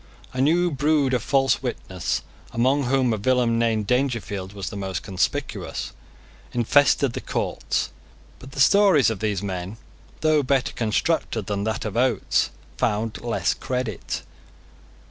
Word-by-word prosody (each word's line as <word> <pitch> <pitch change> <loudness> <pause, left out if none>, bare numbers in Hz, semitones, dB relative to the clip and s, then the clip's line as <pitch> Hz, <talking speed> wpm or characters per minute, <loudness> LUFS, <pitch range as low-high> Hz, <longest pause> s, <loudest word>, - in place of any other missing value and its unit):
A 130 - -1
new 170 +5 +3
brood 145 -1 +2
of 125 - +2
false 135 +2 +2
witnesses, 95 -9 -3 0.3
among 130 +4 +2
whom 130 -2 +2
a - - -1
villain 120 +1 +2
named 110 -2 +1
Dangerfield 115 -6 -1
was 100 -1 -5
the - - -7
most 95 -4 -3
conspicuous, 95 -3 -2 0.6
infested 130 +2 +3
the - - -4
courts: - - -2 0.5
but 135 +1 -12
the - - -6
stories 160 - +5
of 105 - -4
these 105 -3 -1
men, 95 +1 -4 0.4
though 155 -1 +4
better 135 -1 +1
constructed 115 - 0
than 100 0 -2
that 110 0 -2
of 105 -1 -4
Oates, 120 -4 +2 0.3
found 110 +1 -1
less 120 -1 0
credit. 125 -6 -3
120 Hz, 140 wpm, -24 LUFS, 105-135 Hz, 0.6 s, stories